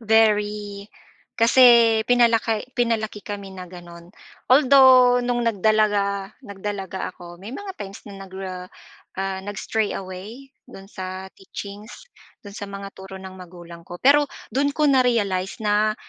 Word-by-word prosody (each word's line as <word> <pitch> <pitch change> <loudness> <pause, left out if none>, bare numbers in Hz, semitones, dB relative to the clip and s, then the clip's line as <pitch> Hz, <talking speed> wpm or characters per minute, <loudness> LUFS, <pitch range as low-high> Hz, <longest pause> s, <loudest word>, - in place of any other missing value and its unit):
very 210 -2 +1 0.5
kasi 235 -2 +6
pinalaki 230 -2 +2
pinalaki 220 -4 -1
kami 200 -2 -7
na 185 -1 -8
gano'n, 175 -1 -12 0.4
although 255 -2 +6
nung 245 0 -1
nagdalaga 205 -2 +1
nagdalaga 195 -2 -5
ako, 175 0 -12
may 215 +7 -9
mga 400 -1 -7
times 195 +1 -8
na 195 -1 -10
nagra 185 -1 -7 0.5
ah, 190 0 -3
nag-stray 205 +2 -3
away 195 +8 -9 0.2
do'n 195 - -12
sa 185 -1 -7
teachings, 205 - -10 0.3
do'n 200 - -10
sa 205 - -6
mga 200 0 -8
turo 190 0 -11
ng 190 0 -10
magulang 175 -2 -12
ko. 175 - -8
Pero 290 +2 +5 0.3
do'n 285 +2 +1
ko 305 - +2
na-realize 230 -9 +1
na, 210 +1 +2
205 Hz, 130 wpm, -22 LUFS, 190-235 Hz, 0.5 s, kasi